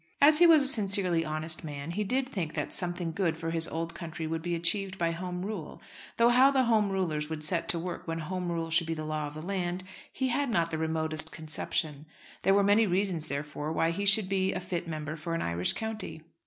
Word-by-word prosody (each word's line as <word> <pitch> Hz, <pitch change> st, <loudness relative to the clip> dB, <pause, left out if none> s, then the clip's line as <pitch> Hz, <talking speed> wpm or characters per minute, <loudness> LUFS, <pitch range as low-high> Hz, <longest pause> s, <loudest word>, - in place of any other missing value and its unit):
As 300 Hz, +2 st, +7 dB
he 345 Hz, -, +8 dB
was 315 Hz, -4 st, +7 dB
a -, -, +3 dB
sincerely 195 Hz, -8 st, +3 dB
honest 155 Hz, +1 st, -3 dB
man, 145 Hz, 0 st, -6 dB
he 210 Hz, +5 st, -1 dB
did 255 Hz, +6 st, 0 dB
think 175 Hz, -, -4 dB
that -, -, -3 dB
something 175 Hz, -2 st, 0 dB
good 165 Hz, -2 st, -1 dB
for 165 Hz, 0 st, -4 dB
his 165 Hz, 0 st, +2 dB
old 165 Hz, +1 st, -4 dB
country 165 Hz, -1 st, -6 dB
would 160 Hz, +1 st, -3 dB
be 175 Hz, +1 st, -2 dB
achieved 190 Hz, +3 st, +1 dB
by 170 Hz, -2 st, 0 dB
Home 180 Hz, +1 st, -4 dB
Rule; 200 Hz, -7 st, -6 dB, 0.4 s
though 235 Hz, +1 st, +5 dB
how 255 Hz, +3 st, +6 dB
the 270 Hz, -2 st, +3 dB
Home 220 Hz, -4 st, +2 dB
Rulers 160 Hz, -6 st, -1 dB
would 155 Hz, -1 st, -5 dB
set 165 Hz, +1 st, +2 dB
to 170 Hz, -, +2 dB
work 175 Hz, +1 st, -5 dB
when 165 Hz, 0 st, -2 dB
Home 180 Hz, +2 st, -3 dB
Rule 165 Hz, -1 st, -3 dB
should 165 Hz, 0 st, +3 dB
be 165 Hz, -, -2 dB
the 155 Hz, 0 st, -5 dB
law 155 Hz, -1 st, -2 dB
of 145 Hz, -, -10 dB
the 155 Hz, -, -7 dB
land, 180 Hz, -1 st, -2 dB, 0.3 s
he 260 Hz, -1 st, -1 dB
had 280 Hz, +2 st, 0 dB
not 170 Hz, -6 st, +1 dB
the 160 Hz, -, -2 dB
remotest 160 Hz, -1 st, -2 dB
conception. 155 Hz, -1 st, -2 dB, 0.3 s
There 195 Hz, -, +3 dB
were 200 Hz, -, +4 dB
many 205 Hz, +2 st, +4 dB
reasons, 180 Hz, -4 st, 0 dB
therefore, 150 Hz, +1 st, -4 dB
why 165 Hz, +1 st, +1 dB
he 200 Hz, +4 st, -3 dB
should 200 Hz, 0 st, +5 dB
be 190 Hz, 0 st, 0 dB
a 180 Hz, -, -2 dB
fit 180 Hz, -1 st, -4 dB
member 155 Hz, -1 st, -4 dB
for 165 Hz, +1 st, -4 dB
an 165 Hz, -, -2 dB
Irish 85 Hz, +1 st, +2 dB
county. 220 Hz, -7 st, -5 dB
170 Hz, 235 wpm, -29 LUFS, 160-195 Hz, 0.4 s, he